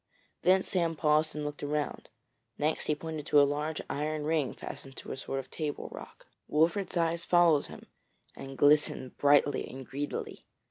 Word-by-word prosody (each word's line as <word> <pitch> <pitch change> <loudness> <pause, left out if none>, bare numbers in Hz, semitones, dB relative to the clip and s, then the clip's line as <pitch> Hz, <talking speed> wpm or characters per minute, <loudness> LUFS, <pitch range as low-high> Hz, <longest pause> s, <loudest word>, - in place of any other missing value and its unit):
Then 185 +2 +4
Sam 170 -3 0
paused 155 0 +2
and 150 -1 -3
looked 150 0 -5
round; 150 0 -3 0.5
next 155 +2 0
he 150 - +2
pointed 155 -1 -6
to 145 - +5
a - - +8
large 150 +2 -2
iron 150 +1 -2
ring 155 -3 +1
fastened 135 -1 -9
to - - -8
a - - -3
sort 135 0 -4
of 135 - -6
table 150 -3 -4
rock. - - -11 0.2
Wolfert's 170 +5 +1
eyes 170 0 +1
followed 175 -5 +4
him, - - -11 0.5
and 135 0 -9
glistened 145 -3 +3
brightly 145 -1 +4
and 130 0 -8
greedily. 145 +3 -5
150 Hz, 170 wpm, -30 LUFS, 145-160 Hz, 0.5 s, a